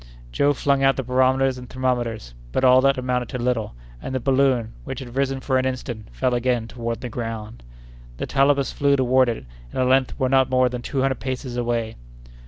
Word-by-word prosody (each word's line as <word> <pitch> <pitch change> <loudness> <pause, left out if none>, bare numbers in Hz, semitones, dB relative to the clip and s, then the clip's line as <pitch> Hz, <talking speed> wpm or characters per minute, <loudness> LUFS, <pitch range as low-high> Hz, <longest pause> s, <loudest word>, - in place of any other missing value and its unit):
Joe 145 - +2
flung 140 0 +1
out 135 0 +4
the 135 - -3
barometers 130 +1 +2
and 125 -1 -11
thermometers, 120 - -2 0.2
but 130 - -1
all 130 0 +6
that 135 +1 +3
amounted 125 -1 -1
to - - -4
little; 120 - -1 0.3
and 130 - -5
the - - +1
balloon, 130 -3 +1
which 135 0 -6
had 125 -2 -9
risen 135 -1 0
for 130 -1 +1
an 130 - -1
instant, 125 -4 -4
fell - - 0
again 120 -2 0
toward 115 -1 -4
the 125 - -4
ground. 115 -1 -6 0.6
The - - -3
Talabas 140 -1 +2
flew 140 0 +2
toward 130 -1 +3
it, 115 - -4 0.3
and - - -4
at 130 - +2
length 130 0 +2
were 130 - +2
not 130 0 +3
more 130 -1 +3
than 125 0 -5
two 135 +2 -2
hundred 135 -2 0
paces 130 -1 -4
away. 120 -2 -2
130 Hz, 205 wpm, -23 LUFS, 120-135 Hz, 0.6 s, all